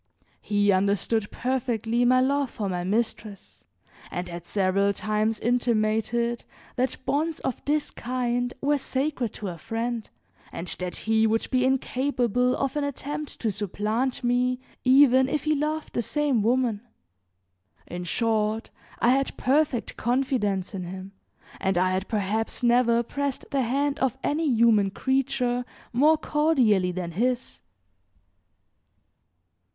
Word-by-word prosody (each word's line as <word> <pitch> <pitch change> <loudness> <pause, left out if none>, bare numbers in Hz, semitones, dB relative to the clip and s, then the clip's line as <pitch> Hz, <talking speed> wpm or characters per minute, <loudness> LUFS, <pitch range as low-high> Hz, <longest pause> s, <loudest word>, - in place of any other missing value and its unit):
He 205 -1 +2
understood 200 +3 +1
perfectly 240 -2 -1
my 255 +1 +5
love 280 0 +1
for 210 -3 -4
my 180 -2 -2
mistress 210 0 -3 0.5
and 180 +1 -4
had 170 0 -8
several 200 0 +1
times 215 +2 -1
intimated 235 0 0 0.3
that 255 +1 0
bonds 315 +2 0
of 260 - -3
this 295 +1 0
kind 245 0 -2
were 290 +1 +2
sacred 265 -4 -2
to 205 - -5
a 170 -2 -8
friend, 225 +3 -3 0.4
and 175 - -6
that 180 -1 -3
he 220 0 +3
would 225 +1 0
be 255 -1 +2
incapable 250 -2 +1
of 275 +1 -2
an 295 - 0
attempt 290 +1 -5
to 225 - +1
supplant 215 +6 -2
me 250 +1 +1 0.2
even 260 0 +6
if 300 - -1
he 310 - +2
loved 305 +1 -2
the - - 0
same 280 0 +1
woman. 235 -1 +1 1.0
In 180 0 -6
short, 220 +3 0 0.3
I 235 - +2
had 270 +2 +1
perfect 275 -2 +1
confidence 235 -7 0
in 185 -2 -4
him 190 +2 -8 0.5
and 190 -2 0
I 185 +1 +3
had 190 +1 -1
perhaps 215 +3 -2
never 235 -1 +4
pressed 280 +2 -3
the 275 - +1
hand 275 +4 0
of 265 -1 0
any 315 +2 0
human 225 -4 +4
creature 250 +1 0 0.3
more 300 +6 +5
cordially 260 - +2
than 175 -1 -4
his. 245 +7 -1
240 Hz, 135 wpm, -26 LUFS, 210-265 Hz, 1.0 s, even